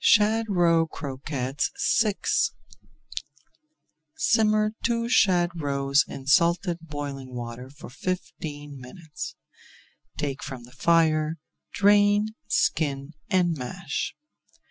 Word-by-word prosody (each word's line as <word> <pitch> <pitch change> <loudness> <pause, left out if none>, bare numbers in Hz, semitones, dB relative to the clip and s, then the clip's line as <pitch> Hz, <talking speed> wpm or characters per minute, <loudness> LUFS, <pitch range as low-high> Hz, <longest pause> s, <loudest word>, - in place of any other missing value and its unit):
SHAD 220 +2 +4
ROE 170 -3 +3
CROQUETTES 140 - -1
VI 210 -3 +1 2.0
Simmer 215 -6 +3
two 230 -1 +1
shad 185 -8 +4
roes 140 0 +2
in 135 - -8
salted 170 +4 +3
boiling 140 -5 -6
water 120 +1 -6
for 145 +1 -12
fifteen 145 -3 -5
minutes. 150 +3 -8 0.8
Take 140 -2 -2
from 130 -4 -7
the 120 - -15
fire, 155 +2 +2 0.3
drain, 205 +1 +4 0.2
skin, 140 -1 0 0.2
and 180 -4 +2
mash. 155 +8 -4
160 Hz, 95 wpm, -26 LUFS, 140-190 Hz, 2.0 s, SHAD